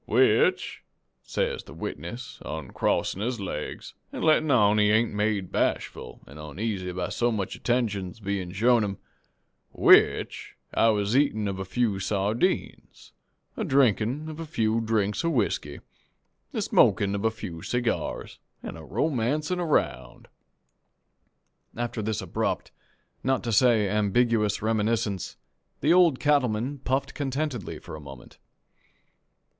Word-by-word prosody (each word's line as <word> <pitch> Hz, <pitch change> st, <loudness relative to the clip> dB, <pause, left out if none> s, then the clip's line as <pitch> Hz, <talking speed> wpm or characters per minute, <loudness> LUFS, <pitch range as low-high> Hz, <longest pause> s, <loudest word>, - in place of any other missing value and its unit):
"'Which,' -, -, +3 dB, 0.4 s
says -, -, -2 dB
the -, -, -12 dB
witness, 120 Hz, +9 st, -7 dB
oncrossin' 80 Hz, +5 st, -2 dB
his 120 Hz, +1 st, -2 dB
laigs 85 Hz, -6 st, -5 dB, 0.2 s
an' -, -, -5 dB
lettin' 155 Hz, -1 st, +4 dB
on 105 Hz, -5 st, +4 dB
he 105 Hz, 0 st, +4 dB
ain't 110 Hz, +1 st, +2 dB
made 105 Hz, -2 st, -1 dB
bashful -, -, -2 dB
an' 70 Hz, -, -13 dB
oneasy 90 Hz, +5 st, -4 dB
by 90 Hz, 0 st, -3 dB
so 120 Hz, 0 st, 0 dB
much 100 Hz, -4 st, -3 dB
attentions 110 Hz, -6 st, -1 dB
bein' 100 Hz, -3 st, -3 dB
shown 115 Hz, +4 st, +3 dB
him, 100 Hz, -1 st, -3 dB, 0.8 s
'which -, -, +4 dB, 0.2 s
I 115 Hz, -, +4 dB
was 105 Hz, 0 st, +1 dB
a 130 Hz, -, +6 dB
eatin' 110 Hz, -8 st, +1 dB
of 95 Hz, -1 st, -3 dB
a 95 Hz, -, -3 dB
few 105 Hz, 0 st, 0 dB
sardines, 105 Hz, -, -2 dB, 0.4 s
a 220 Hz, -, -2 dB
drinkin' 135 Hz, -, +2 dB
of 155 Hz, 0 st, -7 dB
a 165 Hz, -, -4 dB
few 115 Hz, -5 st, 0 dB
drinks 105 Hz, -3 st, 0 dB
of 165 Hz, 0 st, +1 dB
whiskey, 115 Hz, -7 st, -1 dB, 0.7 s
a -, -, -2 dB
smokin' 100 Hz, 0 st, +3 dB
of 100 Hz, 0 st, -2 dB
a 110 Hz, -, +4 dB
few 100 Hz, -7 st, -7 dB
seegyars, 120 Hz, +3 st, -2 dB, 0.2 s
an' -, -, -6 dB
a 80 Hz, -, -10 dB
romancin' 150 Hz, -, -1 dB
'round.'" 65 Hz, -, -1 dB, 1.5 s
After 120 Hz, -1 st, -3 dB
this 110 Hz, -1 st, -2 dB
abrupt, -, -, -2 dB, 0.5 s
not 130 Hz, 0 st, +1 dB
to 115 Hz, -, -2 dB
say 115 Hz, -2 st, +4 dB
ambiguous 105 Hz, +1 st, +1 dB
reminiscence, 110 Hz, -2 st, -1 dB, 0.4 s
the 150 Hz, +5 st, +4 dB
Old 175 Hz, -7 st, +5 dB
Cattleman 135 Hz, -2 st, +1 dB
puffed 135 Hz, +2 st, -1 dB
contentedly 135 Hz, -, -3 dB
a 75 Hz, -, -7 dB
moment. 70 Hz, -4 st, -12 dB
110 Hz, 130 wpm, -26 LUFS, 100-125 Hz, 1.5 s, a